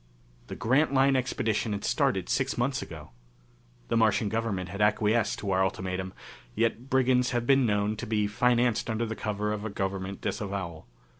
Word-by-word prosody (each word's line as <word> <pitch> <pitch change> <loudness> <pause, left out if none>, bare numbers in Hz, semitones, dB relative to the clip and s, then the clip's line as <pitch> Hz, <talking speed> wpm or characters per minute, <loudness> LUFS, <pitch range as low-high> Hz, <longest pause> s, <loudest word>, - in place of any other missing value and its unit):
The - - -6
Grantline 135 +2 +3
Expedition 115 -4 0
had 100 - -4
started - - +1
six - - 0
months 130 +2 0
ago. 75 -5 -9 0.8
The - - +1
Martian 110 -2 +3
government 105 -5 -2
had 100 +3 -5
acquiesced 110 +2 +2
to 100 -4 -3
our 95 0 +3
ultimatum, 95 0 -3 0.4
yet 115 +3 0
brigands 130 -2 +3
have 120 -1 0
been 135 -1 +4
known 105 0 +1
to - - -5
be 105 -1 +1
financed 120 +2 +1
under 110 +1 0
cover 105 -1 -2
of 105 -1 -4
a 110 - -3
government 95 -1 -3
disavowal. 95 - -4
110 Hz, 160 wpm, -28 LUFS, 100-120 Hz, 0.8 s, been